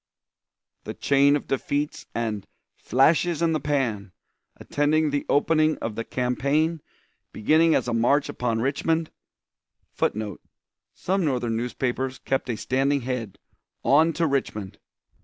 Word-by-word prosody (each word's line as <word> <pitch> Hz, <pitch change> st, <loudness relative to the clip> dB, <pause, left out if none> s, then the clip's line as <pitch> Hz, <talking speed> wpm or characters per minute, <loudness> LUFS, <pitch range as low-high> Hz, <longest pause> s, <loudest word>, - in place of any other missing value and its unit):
_" -, -, -49 dB
The -, -, -6 dB
chain 140 Hz, +1 st, +3 dB
of 145 Hz, -, -3 dB
defeats 145 Hz, +2 st, -2 dB
and 110 Hz, -4 st, -3 dB, 0.3 s
"flashes 160 Hz, +6 st, +2 dB
in 165 Hz, -1 st, +2 dB
the 155 Hz, -, 0 dB
pan" 120 Hz, -10 st, -1 dB, 0.5 s
attending 150 Hz, +1 st, +1 dB
the 145 Hz, 0 st, -2 dB
opening 155 Hz, +1 st, +3 dB
of 115 Hz, -, -4 dB
the 115 Hz, -, -4 dB
campaign 140 Hz, +7 st, 0 dB, 0.5 s
beginning 160 Hz, +8 st, +3 dB
as -, -, 0 dB
a 120 Hz, -, -1 dB
march 135 Hz, +5 st, +2 dB
upon 115 Hz, -2 st, -2 dB
Richmond, 160 Hz, +5 st, 0 dB, 0.8 s
[Footnote: 105 Hz, -1 st, -2 dB, 0.5 s
Some 190 Hz, +1 st, -1 dB
Northern 125 Hz, -6 st, 0 dB
newspapers 125 Hz, +2 st, -2 dB
kept 135 Hz, -1 st, -2 dB
a 115 Hz, -, -1 dB
standing 135 Hz, +5 st, 0 dB
head: 120 Hz, -5 st, -4 dB, 0.5 s
"On 155 Hz, +4 st, +5 dB
to 165 Hz, +2 st, 0 dB
Richmond!" 110 Hz, -9 st, -2 dB
135 Hz, 130 wpm, -25 LUFS, 120-155 Hz, 0.8 s, On